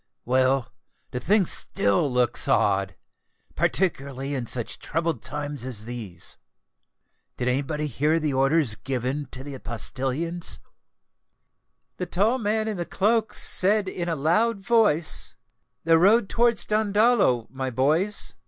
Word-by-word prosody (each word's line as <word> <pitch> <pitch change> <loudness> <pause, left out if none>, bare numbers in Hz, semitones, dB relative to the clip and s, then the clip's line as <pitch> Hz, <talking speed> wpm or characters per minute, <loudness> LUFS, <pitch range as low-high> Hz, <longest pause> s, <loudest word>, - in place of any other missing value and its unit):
Well—the 130 0 -1
thing 200 - +2
still 100 - 0
looks 125 -1 0
odd—particularly 135 - -2
in 125 -4 -3
such 120 -1 -5
troubled 165 0 -2
times 145 -3 -5
as 120 -5 -6
these. 110 -8 -8 1.0
Did 125 - -2
anybody 145 +4 -1
hear 150 +4 +1
the 150 -3 -1
orders 135 -1 +2
given 130 +4 -3
to 130 0 -9
the 140 -2 -8
postilions?" 135 +8 -4 1.4
"The 180 - -3
tall 210 +9 +1
man 220 0 0
in 215 -3 -2
the 175 - -3
cloak 215 +3 +1
said 200 +2 +4
in 175 -2 -3
a 165 - 0
loud 190 +10 +1
voice, 170 - +2 0.5
'_The 165 0 +5
road 205 +4 +4
towards 235 -2 +2
Dandolo, 210 - +2
my 130 0 -3
boys! 155 - +2
150 Hz, 120 wpm, -25 LUFS, 130-195 Hz, 1.4 s, The